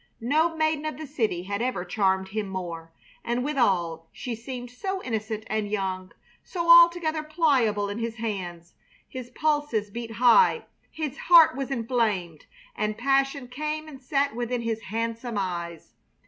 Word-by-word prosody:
No 315 +7 +1
maiden 315 -1 +1
of 310 - -3
the 310 - -6
city 225 -11 -1
had 200 +3 -3
ever 250 -7 -1
charmed 190 0 +1
him 210 0 -3
more, 170 -3 -6 0.3
and 240 +1 -1
withal 180 - 0
she 245 - -5
seemed 245 +1 -7
so 380 +9 -4
innocent 220 -2 -3
and 215 -1 -2
young, 190 -2 -3 0.3
so 340 -2 +1
altogether 340 -2 +6
pliable 270 -10 +1
in 205 +2 -4
his 230 -1 -3
hands. 185 -7 -5 0.3
His 255 -2 -8
pulses 290 -7 0
beat 230 +1 -6
high, 250 - +5 0.2
his 310 -2 -5
heart 330 -3 +7
was 270 0 -3
inflamed, 225 - -1 0.3
and 215 0 -2
passion 270 +1 +1
came 305 +4 -4
and 275 -4 -11
sat 275 -1 0
within 240 0 -2
his 225 -1 -2
handsome 230 +2 -3
eyes. 170 -4 -4
235 Hz, 150 wpm, -26 LUFS, 205-290 Hz, 0.3 s, heart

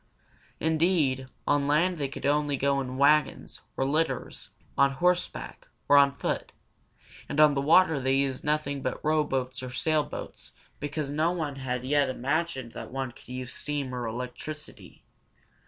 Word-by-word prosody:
Indeed, 160 -5 +1 0.2
on 145 -1 +2
land 170 +4 +2
they 140 - 0
could 135 - -8
go 140 - +4
only 145 -1 +1
in 135 -1 0
wagons, 150 +2 +2 0.2
in 135 +1 0
litters, 160 +2 -1 0.3
on 140 0 +4
horseback, 175 - -1 0.2
or 145 - +6
on 140 -1 +7
foot; 125 - -3 0.8
and 150 - -2
on 150 -1 +7
the 140 - 0
water 160 +1 +5
they 130 0 +1
used 135 -1 0
nothing 150 -2 -1
but 130 +3 -4
rowboats 135 -5 0
or 130 - -5
sailboats, 150 +5 -2 0.3
because 145 0 -3
no 155 +3 +2
one 155 -6 -3
had 125 -2 -3
yet 145 +1 +2
imagined 135 -1 -2
that - - -8
one 135 -1 -3
could 120 - -18
use 130 0 -5
steam 145 -3 -3
or 120 -2 -3
electricity. 125 +6 -7
140 Hz, 155 wpm, -28 LUFS, 130-150 Hz, 0.8 s, on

